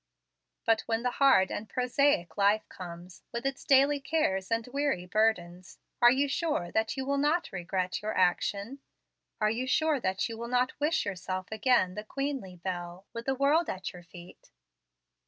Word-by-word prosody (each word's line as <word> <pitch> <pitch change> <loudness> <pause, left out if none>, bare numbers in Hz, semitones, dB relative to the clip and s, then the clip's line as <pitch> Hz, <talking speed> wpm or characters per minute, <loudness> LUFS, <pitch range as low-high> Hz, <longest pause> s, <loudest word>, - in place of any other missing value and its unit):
"But 225 -1 +3
when 225 0 0
the 250 - +1
hard 260 -9 +5
and 215 0 -5
prosaic 250 -5 +1
life 205 +1 +2
comes, 175 -1 -10
with 235 +2 -5
its 270 0 -2
daily 280 +1 +4
cares 265 -10 0
and 230 0 0
weary 280 -11 0
burdens, 180 -3 0 0.2
are 240 - +9
you 270 +3 +2
sure 280 - -1
that 220 +4 0
you 265 - -2
will 280 +1 0
not 305 +5 +1
regret 185 0 -2
your 215 +1 -3
action? 200 +7 0 0.6
are 215 0 +2
you 245 +3 -2
sure 305 +2 +2
that 190 -3 -1
you 225 -1 -7
will 235 - -4
not 250 +2 0
wish 310 +2 +1
yourself 185 -1 -4
again 220 -4 +2
the 210 - -6
queenly 270 -6 -4
belle, 175 +1 -6
with 230 +1 -7
the 270 - +1
world 290 +5 +2
at 190 0 -4
your 180 - -11
feet?" 175 +1 -14
225 Hz, 175 wpm, -29 LUFS, 185-275 Hz, 0.6 s, are